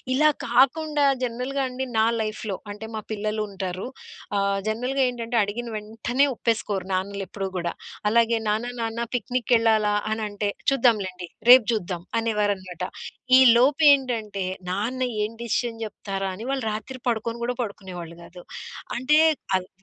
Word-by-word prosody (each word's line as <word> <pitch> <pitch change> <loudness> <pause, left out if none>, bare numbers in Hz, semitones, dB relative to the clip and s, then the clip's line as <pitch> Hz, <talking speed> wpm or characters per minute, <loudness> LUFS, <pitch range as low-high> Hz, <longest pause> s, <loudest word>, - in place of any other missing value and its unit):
ఇలా 305 +2 +5 0.2
కాకుండా 285 +4 +3 0.2
జనరల్‌గా 250 +3 -2
అండి 255 +1 -4
నా 220 - +5 0.2
లైఫ్‌లో 215 -2 -3
అంటే 210 +2 -7
మా 215 - -3
పిల్లలుంటారు. 205 -3 -3 0.5
ఆహ్, 200 0 +1
జనరల్‌గా 250 +5 0
ఏంటంటే 235 -1 -3
అడిగిన 225 +4 -4
వెంటనే 225 +6 0
ఒప్పేసుకోరు 210 -5 -1
నాన్నలెప్పుడూ 195 +1 -3
గూడా. 170 -1 -2 0.4
అలాగే 230 0 +3
నాన్న 220 +4 -1
నాన్న 225 +1 -2
పిక్నిక్‌కెళ్ళాలా 225 -3 +2 0.2
అనంటే, 210 -2 -2 0.2
చూద్దాంలెండి. 205 -9 +1 0.2
రేపు 250 -2 +10
చూద్దాం 180 -5 -3 0.2
అనేవారనమాట. 205 -5 -1 0.5
ఈ - - +8 0.2
లోపేంటంటే 255 -6 +3 0.3
నాన్న 225 +8 -1 0.2
ఏం 210 - -2
డెసిషన్ 235 0 -1
చెప్తారా? 195 -2 -4
అని 200 +4 -8
వాళ్ళు 270 -3 -1
రాత్రి 220 +5 -6
పడుకొను 230 0 -1
గూడా 245 +1 0
పడుకునేవాళ్ళు 185 -6 -6
గాదు. 175 +1 -12 0.5
అంటే 260 +5 +3 0.4
అవ్ 185 -1 -1
220 Hz, 125 wpm, -25 LUFS, 200-245 Hz, 0.5 s, రేపు